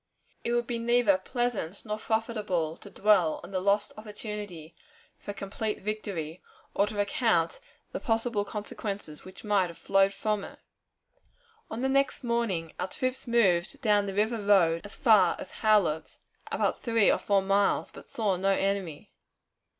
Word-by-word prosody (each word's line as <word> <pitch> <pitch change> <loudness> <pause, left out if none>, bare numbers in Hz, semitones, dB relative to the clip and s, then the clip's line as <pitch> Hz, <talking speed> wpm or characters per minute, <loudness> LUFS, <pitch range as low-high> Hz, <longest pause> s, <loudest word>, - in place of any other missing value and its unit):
It 235 - -1
would 240 0 +1
be 235 -1 -3
neither 230 -4 +3
pleasant 225 -4 -3
nor 215 0 -3
profitable 210 -8 -1
to 205 - -12
dwell 195 -5 +3
on - - -10
the 185 -1 -1
lost 200 +2 +1
opportunity 210 -6 -7 0.5
for - - -12
a - - -2
complete 205 +2 -4
victory, 190 -6 -4 0.3
or 200 - +2
to 210 - -6
recount 200 -4 +1 0.3
the - - -4
possible 225 -2 0
consequences 205 -5 -6
which 185 0 -12
might 205 -4 +2
have 170 - -11
flowed 195 0 +3
from 210 0 -1
it. - - -10 1.1
On 225 - -4
the - - +3
next 275 0 +1
morning, 230 -9 -1
our 180 - -1
troops 255 +6 -3
moved 195 -8 +2
down 205 -2 +3
the 195 - -4
river 220 +2 +1
road 175 -5 +4
as 205 - -9
far 210 -8 +5
as - - -9
Howlett's, 205 -8 +1 0.3
about - - 0
three 230 -4 +3
or - - +1
four 200 -1 +2
miles, 195 +1 +2
but - - -13
saw 210 -4 0
no 195 +2 +1
enemy. 195 -6 -2
205 Hz, 160 wpm, -28 LUFS, 185-225 Hz, 1.1 s, far